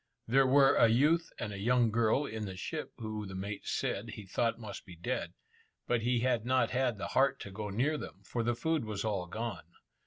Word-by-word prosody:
There 135 Hz, +3 st, +4 dB
were 135 Hz, +1 st, +6 dB
a 115 Hz, -, +6 dB
youth 150 Hz, +9 st, +3 dB
and 105 Hz, -2 st, -4 dB
a 100 Hz, -, -6 dB
young 120 Hz, +1 st, +3 dB
girl 115 Hz, +5 st, +2 dB
in 110 Hz, -4 st, -4 dB
the 95 Hz, -1 st, -7 dB
ship 155 Hz, -, -4 dB
who 110 Hz, -3 st, -4 dB
the 95 Hz, -, -7 dB
mate 100 Hz, +2 st, -5 dB
said 105 Hz, +4 st, -1 dB
he 105 Hz, -1 st, -8 dB
thought 115 Hz, +5 st, 0 dB
must 110 Hz, -2 st, -8 dB
be 90 Hz, -4 st, -12 dB
dead, 85 Hz, -, -3 dB, 0.5 s
but 120 Hz, -2 st, +1 dB
he 120 Hz, 0 st, +1 dB
had 125 Hz, -3 st, +1 dB
not 130 Hz, +2 st, +2 dB
had 125 Hz, -3 st, +1 dB
the 100 Hz, -, -4 dB
heart 135 Hz, +1 st, +3 dB
to 100 Hz, -, -7 dB
go 105 Hz, +1 st, -5 dB
near 135 Hz, +10 st, 0 dB
them, -, -, -9 dB
for 120 Hz, -, -2 dB
the 120 Hz, +1 st, +1 dB
food 160 Hz, +2 st, 0 dB
was 105 Hz, -2 st, -3 dB
all 100 Hz, -5 st, -1 dB
gone. 110 Hz, -3 st, -5 dB
115 Hz, 220 wpm, -32 LUFS, 105-130 Hz, 0.5 s, were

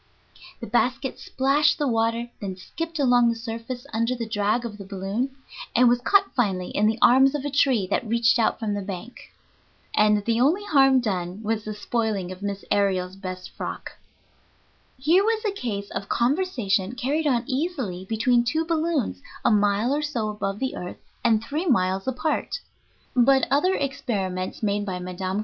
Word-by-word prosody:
The -, -, -4 dB
basket 250 Hz, +3 st, 0 dB
splashed 285 Hz, +3 st, +2 dB
the 295 Hz, -3 st, 0 dB
water, 230 Hz, 0 st, 0 dB
then 195 Hz, -2 st, -4 dB
skipped 330 Hz, -, -6 dB
along 245 Hz, -4 st, +4 dB
the 230 Hz, -, 0 dB
surface 230 Hz, +2 st, -6 dB
under 230 Hz, +3 st, 0 dB
the 230 Hz, -2 st, -4 dB
drag 215 Hz, +2 st, 0 dB
of 210 Hz, -3 st, -7 dB
the -, -, -6 dB
balloon, 195 Hz, +6 st, -3 dB, 0.5 s
and 250 Hz, +1 st, +6 dB
was 240 Hz, 0 st, +3 dB
caught 395 Hz, +8 st, +3 dB
finally 190 Hz, -7 st, 0 dB
in 210 Hz, -, +2 dB
the 220 Hz, +1 st, +1 dB
arms 265 Hz, +3 st, +6 dB
of 290 Hz, -1 st, -3 dB
a 290 Hz, -, -2 dB
tree 265 Hz, -7 st, +3 dB
that 230 Hz, -, 0 dB
reached 235 Hz, +1 st, +3 dB
out 225 Hz, -, +2 dB
from 215 Hz, -2 st, -2 dB
the 205 Hz, -, -2 dB
bank. 195 Hz, +5 st, -8 dB, 0.6 s
And 210 Hz, -1 st, +3 dB
the 230 Hz, 0 st, +1 dB
only 330 Hz, +10 st, +3 dB
harm 270 Hz, -7 st, +5 dB
done 190 Hz, -2 st, -3 dB
was 220 Hz, 0 st, -1 dB
the 215 Hz, -1 st, -4 dB
spoiling 210 Hz, -4 st, -2 dB
of 185 Hz, +1 st, -9 dB
Miss 200 Hz, -1 st, -4 dB
Aërial's 190 Hz, -2 st, +1 dB
best 185 Hz, -2 st, -7 dB
frock! -, -, -6 dB, 1.1 s
Here 325 Hz, +9 st, +4 dB
was 445 Hz, +1 st, 0 dB
a 420 Hz, -, +2 dB
case 210 Hz, -, -4 dB
of 195 Hz, -, -5 dB
conversation 235 Hz, -, 0 dB
carried 290 Hz, +6 st, 0 dB
on 240 Hz, -4 st, +2 dB
easily 260 Hz, -, -3 dB
between 235 Hz, +3 st, +2 dB
two 315 Hz, +7 st, 0 dB
balloons 315 Hz, -, -1 dB, 0.2 s
a -, -, +5 dB
mile 205 Hz, +4 st, +2 dB
or 295 Hz, -, 0 dB
so 250 Hz, -8 st, -2 dB
above 200 Hz, -1 st, -3 dB
the 265 Hz, +3 st, -2 dB
earth 180 Hz, -, -6 dB, 0.3 s
and 225 Hz, -2 st, +3 dB
three 305 Hz, +9 st, -3 dB
miles 190 Hz, -, +1 dB
apart. 265 Hz, +5 st, -1 dB, 0.6 s
But 265 Hz, +2 st, +5 dB
other 365 Hz, +8 st, +3 dB
experiments 200 Hz, -10 st, -3 dB
made 205 Hz, 0 st, +1 dB
by 190 Hz, -3 st, -3 dB
Mme. 185 Hz, +2 st, -3 dB
230 Hz, 175 wpm, -24 LUFS, 200-270 Hz, 1.1 s, and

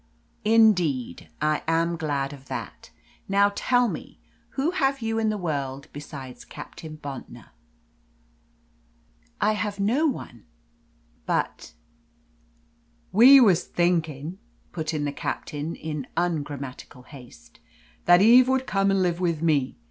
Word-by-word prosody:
"Indeed, 180 Hz, -, +2 dB
I 155 Hz, 0 st, +1 dB
am 165 Hz, +1 st, +1 dB
glad 145 Hz, -4 st, -2 dB
of 135 Hz, -1 st, -13 dB
that. -, -, -7 dB, 0.4 s
Now, 200 Hz, +1 st, +3 dB
tell 245 Hz, +2 st, +2 dB
me, -, -, -7 dB, 0.4 s
who 285 Hz, +5 st, +1 dB
have 275 Hz, -6 st, 0 dB
you 225 Hz, 0 st, -1 dB
in 220 Hz, -1 st, +1 dB
the 215 Hz, -, -1 dB
world 140 Hz, -6 st, -4 dB
besides 140 Hz, -3 st, -9 dB
Captain 155 Hz, -1 st, -10 dB
Bontnor?" 140 Hz, -3 st, -9 dB, 1.9 s
"I 210 Hz, -, +3 dB
have 210 Hz, -1 st, -3 dB
no 245 Hz, +11 st, +2 dB
one. 120 Hz, -, -6 dB, 0.8 s
But -, -, -2 dB, 0.7 s
" -, -, -38 dB
"We 270 Hz, +3 st, +10 dB
was 195 Hz, -9 st, +4 dB
thinking," 170 Hz, -1 st, -1 dB, 0.3 s
put 160 Hz, -2 st, -3 dB
in 150 Hz, -2 st, -2 dB
the 145 Hz, -, -1 dB
Captain, 150 Hz, +2 st, -4 dB
in 150 Hz, -4 st, -5 dB
ungrammatical 145 Hz, -7 st, -4 dB
haste, 125 Hz, -2 st, -15 dB, 0.5 s
"that 175 Hz, +2 st, +6 dB
Eve 245 Hz, +3 st, +7 dB
would 265 Hz, 0 st, +1 dB
come 195 Hz, -3 st, +1 dB
and 195 Hz, -1 st, +2 dB
live 175 Hz, -1 st, 0 dB
with 170 Hz, -3 st, -1 dB
me. 145 Hz, -5 st, +1 dB
170 Hz, 125 wpm, -25 LUFS, 145-210 Hz, 1.9 s, We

